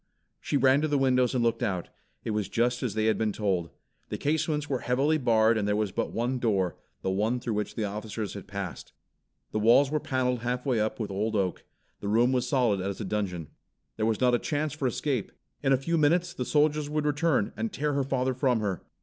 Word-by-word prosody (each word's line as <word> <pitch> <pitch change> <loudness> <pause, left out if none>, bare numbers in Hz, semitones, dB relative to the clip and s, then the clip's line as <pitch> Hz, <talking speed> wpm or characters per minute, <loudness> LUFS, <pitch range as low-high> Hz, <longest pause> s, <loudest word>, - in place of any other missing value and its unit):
She 145 - 0
ran 135 +1 +4
to 155 - +1
the 145 -1 +1
windows 130 -1 +2
and 120 - +2
looked 115 0 +1
out. 90 -4 -2 0.3
It - - -2
was 105 -2 -1
just 120 +1 +1
as 115 -5 -2
they 110 0 +1
had 110 - +2
been 110 -1 +1
told. 95 -6 -1 0.4
The - - -3
casements 150 0 0
were 130 -3 -1
heavily 140 +6 +1
barred 115 -3 +3
and 100 - -1
there 105 - +2
was 105 -2 0
but - - -2
one 125 +3 -1
door, 100 -7 +1 0.3
the 95 - 0
one 110 +6 0
through 115 -2 -3
which 105 0 -3
the 110 - -1
officers 105 +1 -4
had 100 - -8
passed. 100 -3 -6 0.6
The 110 - -1
walls 120 +6 +5
were 150 - +1
paneled 125 -3 0
half 125 +2 -2
way 125 -5 +1
up 110 +2 -1
with 105 -3 -3
old 110 +3 -1
oak. 95 -3 -1 0.3
The 100 - -5
room 115 +4 +3
was 125 -1 0
solid 120 -8 +2
as 100 +1 -3
a 110 - -3
dungeon. 90 -6 -3 0.5
There 110 0 +1
was 110 -2 0
not 125 -1 +3
a 120 - +3
chance 150 -2 -1
for 145 -4 -1
escape. 130 -2 -2 0.3
In 135 - +1
a 135 - +5
few 165 +5 0
minutes 175 +4 +2
the 125 - -3
soldiers 150 0 +2
would 150 0 -1
return 150 -6 +1
and 110 0 -2
tear 150 +1 -1
her 140 0 +1
father 130 -1 0
from 125 -2 +1
her. 100 -4 -2
120 Hz, 230 wpm, -28 LUFS, 105-135 Hz, 0.6 s, walls